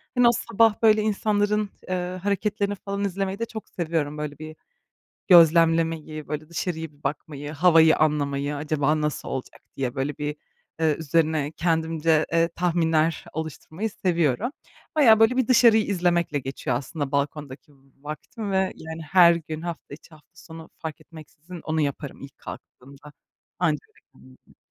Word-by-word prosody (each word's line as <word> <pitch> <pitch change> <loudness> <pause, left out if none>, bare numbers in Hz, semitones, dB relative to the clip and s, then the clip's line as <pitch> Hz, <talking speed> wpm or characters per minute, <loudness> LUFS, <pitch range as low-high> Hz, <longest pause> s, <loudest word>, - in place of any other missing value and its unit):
hani, 245 -1 +5
o - - +7
sabah, 225 -1 +2
böyle, 215 -1 +5
insanların, 210 0 0 0.2
eee, 180 0 -3
hareketlerini 205 0 -1
falan 200 +1 -4
izlemeyi 195 +1 -2
de 230 - -1
çok 220 -1 -9
seviyorum. 160 -4 -2
Böyle, 150 -1 -5
bir 155 0 -8 0.7
gözlemlemeyi, 165 -3 +4
böyle, 150 +2 -5
dışarıya 160 -2 -4
bir 145 0 -27
bakmayı, 145 0 -5
havayı 160 0 +5
anlamayı. 145 -1 0
Acaba 150 +1 0
nasıl 150 -1 -3
olacak, 130 -1 -6
diye, 130 -1 -3
böyle, 140 +2 -2
bir, 150 0 -3 0.4
eee, 160 -2 +2
üzerine 155 -1 +1
kendimce, 160 -1 +1
eee, 165 0 +3
tahminler 165 -2 +1
oluşturmayı 160 +6 -5
seviyorum. 175 - 0 0.4
Bayağı, 230 -8 +6
böyle, 225 +3 +4
bir 260 - +2
dışarıyı 230 -3 +6
izlemekle 175 -5 0
geçiyor 135 -2 -3
aslında 140 +1 -5
balkondaki 145 0 -3 0.3
vaktim 175 +8 -6
ve, 190 - +2 0.2
yani, 160 +1 -8
her 175 -2 +7
gün, 160 -1 -6
hafta 170 -4 -7
içi, 155 - -13
hafta 155 -2 -19
sonu 165 -1 -12
fark 160 -2 -7
etmeksizin 165 +2 -12
onu 155 0 -1
yaparım 140 0 -4
ilk 140 -1 -11
kalktığımda 140 +3 -12 0.5
anca 155 -4 +1
öyle - - -27
kendime 65 -1 -18
gelirim. - - -24
160 Hz, 150 wpm, -24 LUFS, 150-185 Hz, 0.7 s, o